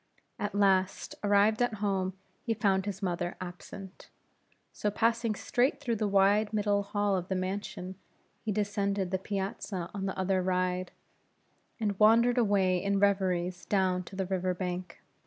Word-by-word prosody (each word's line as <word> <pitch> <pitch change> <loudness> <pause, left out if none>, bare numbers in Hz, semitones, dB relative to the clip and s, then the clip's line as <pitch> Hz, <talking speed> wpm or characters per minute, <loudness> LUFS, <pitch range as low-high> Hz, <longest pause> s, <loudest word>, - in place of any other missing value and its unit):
At 205 -1 -3
last, 195 -2 +2
arrived 205 +2 +4
at 245 -2 +1
home, 195 -2 -1 0.3
he 225 - -1
found 195 -2 +1
his 200 0 -4
mother 175 -1 -1
absent; 185 +1 -9 0.6
so 210 - -1
passing 230 +1 +1
straight 255 +7 +1
through 240 -6 -1
the 210 0 0
wide 200 +2 +3
middle 205 -1 +2
hall 205 0 0
of 180 -1 -2
the 190 - -1
mansion, 185 0 -4 0.5
he 220 - -1
descended 200 -2 -1
the 190 - 0
piazza 195 -2 -4
on 195 -1 -3
the 190 - -4
other 190 0 +1
ride, 185 0 0 0.9
and 205 -3 -1
wandered 235 +3 +5
away 195 -5 +2
in 200 0 +1
reveries 185 -3 +1
down 185 -2 +1
to 195 - -10
the 190 0 -1
river 185 -1 -1
bank. 180 -1 -5
195 Hz, 155 wpm, -30 LUFS, 185-205 Hz, 0.9 s, wandered